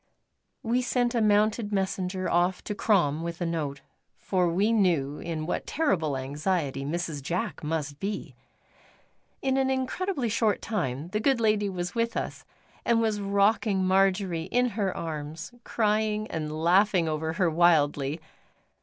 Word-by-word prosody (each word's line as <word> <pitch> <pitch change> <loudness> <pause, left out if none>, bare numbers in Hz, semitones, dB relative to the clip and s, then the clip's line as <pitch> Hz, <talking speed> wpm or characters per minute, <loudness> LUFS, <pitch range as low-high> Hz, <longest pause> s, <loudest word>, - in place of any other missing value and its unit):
We 240 +2 +1
sent 245 -1 0
a 235 - +1
mounted 210 +1 +2
messenger 190 -1 -1
off 175 +2 +1
to 210 - -3
Crom 175 -8 +2
with 170 0 -5
a 175 - -1
note, 150 -5 -3 0.4
for 180 -3 0
we 195 +6 +2
knew 165 -10 +1
in 160 -2 -4
what 175 - -3
terrible 165 - 0
anxiety 140 +1 -2
Mrs. 155 0 -3
Jack 175 +10 -3
must 150 -2 -3
be. 195 -7 -4 1.1
In 265 0 +1
an 265 0 +2
incredibly 265 +3 -1
short 220 -1 +1
time 150 - -3
the 210 - -1
good 260 +2 +2
lady 215 -2 +2
was 180 0 -4
with 230 0 -1
us; - - -4 0.4
and 235 -1 +3
was 220 -2 0
rocking 200 0 +2
Marjory 190 -3 +2
in 245 +6 +1
her 200 -4 -2
arms, 160 +2 -5
crying 215 -1 0
and 155 -2 -3
laughing 175 +3 +3
over 160 +1 -2
her 175 -2 +1
wildly. 155 -3 +3
185 Hz, 145 wpm, -27 LUFS, 160-215 Hz, 1.1 s, and